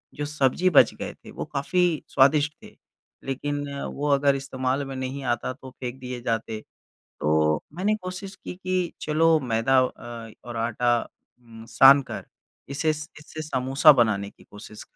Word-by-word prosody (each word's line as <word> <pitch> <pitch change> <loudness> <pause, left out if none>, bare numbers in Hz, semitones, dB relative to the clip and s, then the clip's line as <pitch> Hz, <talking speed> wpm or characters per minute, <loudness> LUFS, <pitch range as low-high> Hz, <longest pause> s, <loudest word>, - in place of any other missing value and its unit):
जो 145 - -3
सब्ज़ी 150 +4 +1
बच 155 - +6
गए - - -6
थे - - -15
वो - - -5
काफ़ी 170 +3 0
स्वादिष्ट 145 +2 +4
थे, - - -14 0.5
लेकिन 145 +2 -3 0.2
वो 145 +1 -4
अगर 140 0 +3
इस्तेमाल 135 0 -2
में 135 0 -7
नहीं 130 +1 -4
आता 125 +2 -5
तो 130 0 -12
फेंक 125 0 -7
दिए 125 -1 -6
जाते, 115 -2 -2 0.6
तो 75 0 +2
मैंने 200 +4 +1
कोशिश 185 +2 -6
की - - -8
कि 185 -2 -2
चलो 160 +1 +3
मैदा 115 +4 +3
अ, 120 -2 -5 0.2
और 120 - -6
आटा 120 +1 +1 0.4
उम, 115 -2 -13
सानकर 135 +3 +5 0.5
इसे 155 +3 +1
स 155 0 -7
इससे 155 +1 -8
समोसा 135 +1 +4
बनाने 110 -6 +1
की - - -21
कोशिश 105 +1 -11
135 Hz, 155 wpm, -25 LUFS, 120-150 Hz, 0.6 s, बच